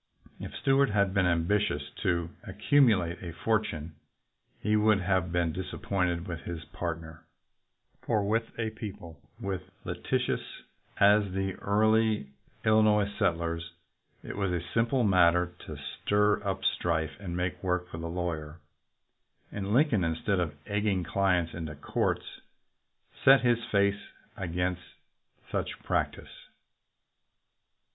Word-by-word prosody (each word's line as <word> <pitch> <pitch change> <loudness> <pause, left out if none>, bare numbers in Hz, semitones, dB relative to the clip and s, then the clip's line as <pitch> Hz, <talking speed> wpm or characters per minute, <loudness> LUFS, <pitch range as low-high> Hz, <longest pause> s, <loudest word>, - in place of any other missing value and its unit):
If - - -7
Stuart 135 -1 +3
had 100 -2 +2
been 95 -2 +3
ambitious 85 -3 +1
to 85 -2 0
accumulate 105 -12 +2
a 85 -3 -6
fortune, 85 -7 -1 0.7
he 105 +1 +1
would 105 -2 +4
have 90 -2 +1
been 85 -2 +1
disappointed 90 -1 -2
with 85 -2 -4
his 85 -1 -6
partner; 80 -1 -6 0.8
for, 105 -3 0
with 115 +2 +1
a 110 -2 -1
people 100 -7 -8 0.2
as 95 -2 -2 0.2
litigious 120 +8 -1 0.6
as 100 0 +5
the 95 0 -1
early 110 -5 +2 0.3
Illinois 105 -2 +4
settlers, 85 0 -1 0.5
it - - -6
was 100 -2 0
a 85 -1 -2
simple 120 +2 +2
matter 90 -3 +4
to - - -6
stir 105 0 +1
up 95 -1 -2
strife 80 -3 +1
and 90 -3 -5
make 90 0 -2
work 90 -1 -1
for 85 - -7
the 85 0 -4
lawyer, 85 -2 -4 0.9
and 100 -1 -4
Lincoln, 120 - +3
instead 85 +4 0
of 80 -4 -2
egging 105 -3 0
clients 90 -3 +1
into 80 -2 -5
the - - -22
courts, - - -1 1.0
set 135 0 +8
his 120 -1 +2
face 100 0 +2 0.3
against 90 0 -2 0.7
such - - -2
practice. - - -3
95 Hz, 125 wpm, -29 LUFS, 85-105 Hz, 1.0 s, set